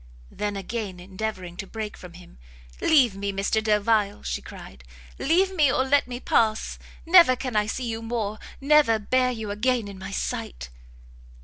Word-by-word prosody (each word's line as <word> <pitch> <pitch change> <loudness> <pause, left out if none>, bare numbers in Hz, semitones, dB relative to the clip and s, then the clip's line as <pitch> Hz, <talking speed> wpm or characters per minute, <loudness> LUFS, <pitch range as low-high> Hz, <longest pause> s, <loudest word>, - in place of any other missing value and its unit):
Then 205 -1 -3
again 195 -2 -5
endeavouring 185 -1 -6
to 195 - -6
break 215 0 -6
from 180 -2 -12
him, 175 - -15 0.4
"Leave 255 -10 +4
me, 200 0 -3
Mr 200 +3 0
Delvile," 210 -1 +1
she 60 - -3
cried, 65 -2 -12 0.4
"leave 370 +6 +2
me, 295 -6 +4
or 260 - +2
let 280 0 +3
me 245 0 -6
pass! 220 -3 +1 0.3
never 335 -6 +7
can 250 -2 -5
I 210 0 +2
see 250 +3 -3
you 225 0 -4
more! 225 -2 -3 0.2
never 280 -5 +4
bear 255 +4 +1
you 220 -4 -4
again 235 +1 0
in 200 -1 -9
my 190 +1 -7
sight!" - - -4
220 Hz, 170 wpm, -25 LUFS, 195-255 Hz, 0.4 s, never